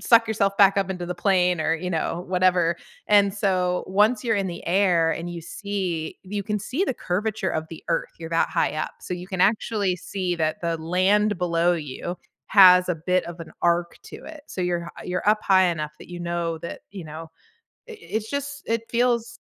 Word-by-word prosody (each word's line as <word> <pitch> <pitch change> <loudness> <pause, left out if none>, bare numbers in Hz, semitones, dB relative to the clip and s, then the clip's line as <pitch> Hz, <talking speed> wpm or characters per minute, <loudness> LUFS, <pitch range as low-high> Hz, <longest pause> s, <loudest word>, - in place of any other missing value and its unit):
suck 230 -1 +5
yourself 200 -2 +1
back 200 -1 +6
up 195 -1 +1
into 180 -2 -4
the 180 - -3
plane 180 -4 +2
or, 160 +1 +1
you 180 +2 -4
know, 170 +1 -2
whatever. 180 -2 +2 0.3
And 200 -1 +5
so, 185 -3 0
once 210 +4 +3
you're 225 -2 +2
in 195 -1 0
the 175 - -6
air, 175 -3 +3
and 170 +1 -3
you 170 - -6
see 180 -2 -4
you 200 +1 -4
can 210 0 -1
see 275 - -1
the 265 - -2
curvature 200 +1 -2
of 160 0 -2
the 165 - -9
Earth, 165 - 0
you're 165 0 -7
that 165 - +1
high - - 0
up. 155 - -3
So 180 - -4
you 180 0 -8
can 190 -1 -4
actually 205 -1 +2
see 180 0 -3
that 155 -1 -1
the 170 -1 -1
land 185 +4 +2
below 175 0 +2
you 160 +3 -5 0.3
has 180 -2 +7
a 180 - +1
bit 180 +3 0
of 170 0 -8
an 160 -1 -9
arc 170 0 +1
to - - -10
it. 315 -2 -10
So 185 - -6
you're 175 -1 -1
hi - - -10
you're 180 +3 -2
up 215 0 +3
high 190 -1 +5
enough 155 -2 -3
that - - -13
you 175 0 -7
know 170 -1 -2
that 170 - -7
you 195 -3 -8
know, 160 +1 -9 0.6
i - - -7
i - - -9
it's 220 0 -4
just 285 0 -4
it 230 0 0
feels 240 0 0
180 Hz, 215 wpm, -24 LUFS, 170-205 Hz, 0.6 s, has